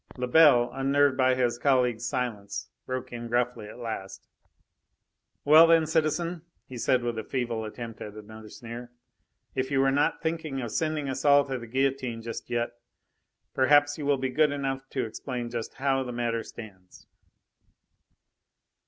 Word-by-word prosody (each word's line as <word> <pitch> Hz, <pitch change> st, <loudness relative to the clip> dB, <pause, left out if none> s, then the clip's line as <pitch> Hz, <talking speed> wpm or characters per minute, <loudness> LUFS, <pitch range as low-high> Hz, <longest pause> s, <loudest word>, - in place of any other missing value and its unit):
Lebel, 125 Hz, -1 st, +5 dB
unnerved 140 Hz, +1 st, +2 dB
by 130 Hz, -1 st, +3 dB
his 120 Hz, -2 st, 0 dB
colleague's 125 Hz, -3 st, +2 dB
silence, 105 Hz, -6 st, -3 dB, 0.2 s
broke 130 Hz, -1 st, -4 dB
in 120 Hz, 0 st, -5 dB
gruffly 120 Hz, -2 st, -1 dB
at -, -, -11 dB
last: 110 Hz, -5 st, -6 dB, 1.2 s
"Well 155 Hz, +3 st, +8 dB
then, 165 Hz, -1 st, +5 dB
citizen," 160 Hz, +2 st, 0 dB, 0.2 s
he 130 Hz, -, -10 dB
said, 125 Hz, +1 st, +2 dB
with 120 Hz, -2 st, -2 dB
a -, -, -4 dB
feeble 120 Hz, -3 st, -3 dB
attempt 115 Hz, +1 st, -8 dB
at 105 Hz, 0 st, -7 dB
another 110 Hz, 0 st, -11 dB
sneer, 120 Hz, +1 st, -9 dB, 0.6 s
"if 130 Hz, 0 st, -2 dB
you 135 Hz, -1 st, +1 dB
are 135 Hz, -, +3 dB
not 145 Hz, +2 st, +1 dB
thinking 160 Hz, -4 st, -3 dB
of 120 Hz, -4 st, -4 dB
sending 155 Hz, +1 st, -1 dB
us 135 Hz, 0 st, -3 dB
all 145 Hz, -1 st, +6 dB
to 130 Hz, -2 st, -4 dB
the 120 Hz, -, -9 dB
guillotine 130 Hz, -2 st, -1 dB
just 115 Hz, +1 st, -7 dB
yet, 120 Hz, -1 st, -1 dB, 0.8 s
perhaps 145 Hz, +3 st, +4 dB
you 145 Hz, -, -3 dB
will 145 Hz, -1 st, +3 dB
be 130 Hz, 0 st, -2 dB
good 150 Hz, +2 st, +3 dB
enough 135 Hz, -1 st, -3 dB
to 130 Hz, -3 st, -2 dB
explain 120 Hz, +1 st, -5 dB
just 115 Hz, -2 st, -5 dB
how 135 Hz, 0 st, +1 dB
the 125 Hz, -1 st, -4 dB
matter 120 Hz, -1 st, -1 dB
stands?" 100 Hz, -5 st, -12 dB
130 Hz, 160 wpm, -27 LUFS, 120-140 Hz, 1.2 s, Well